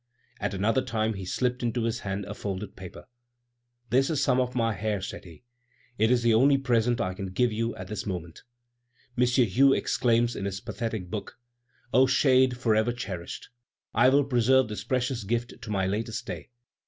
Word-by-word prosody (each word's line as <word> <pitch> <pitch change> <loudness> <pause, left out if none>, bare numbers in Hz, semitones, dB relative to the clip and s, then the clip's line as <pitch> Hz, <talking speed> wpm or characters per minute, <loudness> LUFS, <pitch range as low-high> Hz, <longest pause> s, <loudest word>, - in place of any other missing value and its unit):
At - - -2
another 110 +7 +2
time 110 -2 -1
he 95 -2 -7
slipped 125 +6 -1
into 120 -1 -1
his 115 0 -1
hand 100 0 -4
a - - -6
folded 100 0 -5
paper. 95 +4 -10 0.8
"This 135 +3 +3
is 155 -4 0
some 130 -2 +3
of 125 0 -1
my 115 -2 +1
hair," 105 -1 -2
said 95 - -7
he; 85 +5 -14 0.6
"it 110 +1 +4
is 120 -1 +3
the 115 -1 +4
only 135 +5 +5
present 120 -3 +1
I 95 - -1
can 95 +1 -5
give 115 +6 +1
you 115 +1 -2
at 95 - -8
this 105 +1 -5
moment." 85 -4 -5 0.7
M. 125 0 +3
Hue 125 +2 +4
exclaims 120 -1 +1
in 100 - -4
his 95 -1 -3
pathetic 105 -2 -5
book: 110 +1 -6 0.6
"O 130 +3 +6
shade 130 -1 +3
forever 110 -1 +2
cherished! 95 -7 -6 0.4
I 130 - +5
will 140 +2 +4
preserve 130 -1 +3
this 105 - -5
precious 125 -2 -1
gift 120 +3 -3
to 115 - -8
my 95 -2 0
latest 110 +4 -3
day! - - -7
115 Hz, 185 wpm, -27 LUFS, 100-125 Hz, 0.8 s, O